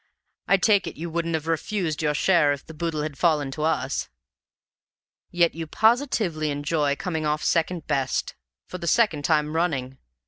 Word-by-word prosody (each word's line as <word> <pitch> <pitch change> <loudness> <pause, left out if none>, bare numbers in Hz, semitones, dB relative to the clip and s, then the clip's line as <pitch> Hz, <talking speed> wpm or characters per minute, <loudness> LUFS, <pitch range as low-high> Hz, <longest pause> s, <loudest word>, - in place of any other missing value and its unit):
I 195 - +5
take 200 0 +3
it - - -6
you 170 +1 -5
wouldn't 165 0 -1
have 160 -1 -3
refused 165 0 -2
your 150 -1 +1
share 165 -4 +3
if 140 - -8
the 160 - -10
boodle 160 -1 -2
had 150 -3 -6
fallen 150 -5 +2
to 150 - -6
us? 160 +1 -1 1.2
Yet 170 -1 +2
you 165 0 -6
positively 220 - +1
enjoy 145 0 0
coming 160 -2 -3
off 150 +1 -1
second 165 0 0
best 135 -2 -1 0.3
for 180 - -8
the 170 - -5
second 165 -9 +2
time 155 -1 +1
running! 135 -6 -1
160 Hz, 170 wpm, -24 LUFS, 150-175 Hz, 1.2 s, I